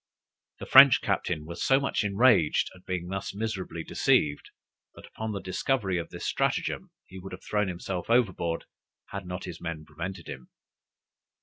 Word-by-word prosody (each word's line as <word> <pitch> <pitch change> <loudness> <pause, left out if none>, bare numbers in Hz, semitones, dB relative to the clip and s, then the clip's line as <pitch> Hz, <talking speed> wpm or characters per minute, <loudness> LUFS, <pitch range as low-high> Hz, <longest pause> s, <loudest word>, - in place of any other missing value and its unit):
The - - -7
French - - +9
captain 75 - -1
was 85 +2 -5
so 135 0 +4
much 140 -5 -1
enraged 105 -5 +3
at 90 -1 -18
being 90 -1 -3
thus 95 +1 -4
miserably 100 -6 -4
deceived, 75 -2 +1 0.5
that, - - -12
upon 110 0 -5
the 100 - -3
discovery 95 +1 -1
of 85 - -6
the - - -9
stratagem, - - -1 0.2
he 95 - -11
would 95 0 -9
have 90 - -9
thrown 105 -1 0
himself 90 +1 -4
overboard, 95 -8 +1 0.4
had 100 -2 -6
not 90 +1 -5
his 90 -3 -8
men 85 -3 -5
prevented 85 +3 -7
him. 65 -1 -9
95 Hz, 165 wpm, -28 LUFS, 85-105 Hz, 0.5 s, French